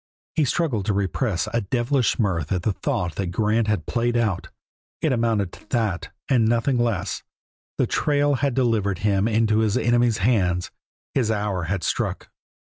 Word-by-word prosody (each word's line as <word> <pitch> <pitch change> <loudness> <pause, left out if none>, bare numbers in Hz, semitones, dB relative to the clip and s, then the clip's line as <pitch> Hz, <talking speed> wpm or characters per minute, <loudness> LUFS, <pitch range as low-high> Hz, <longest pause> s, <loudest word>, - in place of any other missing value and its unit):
He 155 - +2
struggled 125 - 0
to 105 - +1
repress 100 - 0
a 115 - +1
devilish 120 +4 +1
mirth 90 - 0
at 90 -3 0
the 105 - +1
thought 100 - -2
that 95 - -1
Grant 105 +5 +1
had 105 -7 0
played 120 0 0
out 110 -6 -1 0.5
it 155 -4 +1
amounted 115 -6 +1
to - - -15
that 105 -7 -1 0.2
and 120 -5 +3
nothing 120 +2 +2
less; 105 -5 -1 0.6
the - - +3
trail 145 -1 +1
had 140 -4 +1
delivered 110 -7 +1
him 100 0 +2
into 110 -1 +2
his 110 -2 +2
enemy's 120 -1 +2
hands, 90 -5 +1 0.4
his 125 -5 +1
hour 105 -5 -1
had 90 +1 -2
struck. - - -2
110 Hz, 165 wpm, -23 LUFS, 95-120 Hz, 0.6 s, and